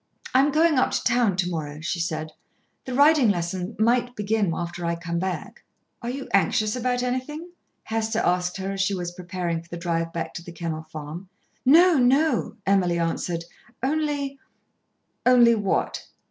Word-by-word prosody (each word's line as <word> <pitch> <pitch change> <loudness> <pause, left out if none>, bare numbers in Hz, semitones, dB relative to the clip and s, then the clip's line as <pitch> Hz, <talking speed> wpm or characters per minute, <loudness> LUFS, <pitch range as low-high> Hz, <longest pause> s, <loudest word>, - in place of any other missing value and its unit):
"I 255 - +5
am 285 +2 +4
going 310 -1 +4
up - - +3
to - - 0
town 240 -5 +2
to 180 -2 +1
morrow," 150 -4 -4
she 170 +2 -3
said. 155 -2 -3 0.5
"The 255 - -4
riding 285 -3 +5
lessons 180 +2 -2
might 245 +2 +2
begin 210 -2 0
after 175 +1 -4
I 170 0 0
come 170 0 -3
back." 185 0 -4 0.4
"Are 235 - -4
you 265 +2 -5
anxious 210 +3 +2
about 250 0 0
anything?" 260 +7 -3 0.3
Hester 225 0 -2
asked 180 -3 +1
her 190 0 -3
as 195 -1 -2
she 195 0 +1
was 175 -1 -4
preparing 175 -2 -3
for 170 - -21
the 170 - -6
drive 165 -1 -1
back 165 - -4
to 170 - -7
The 175 - -10
Kennel 165 -2 -4
Farm. 155 +4 -8 0.4
"No, 330 +2 +7
no," 270 +2 +2
Emily 185 -3 +2
answered. 170 0 -2 0.4
"Only 285 -1 -1 0.4
" - - -49
"Only 240 -2 +7
what?" 205 -4 -1
195 Hz, 175 wpm, -24 LUFS, 170-250 Hz, 0.5 s, No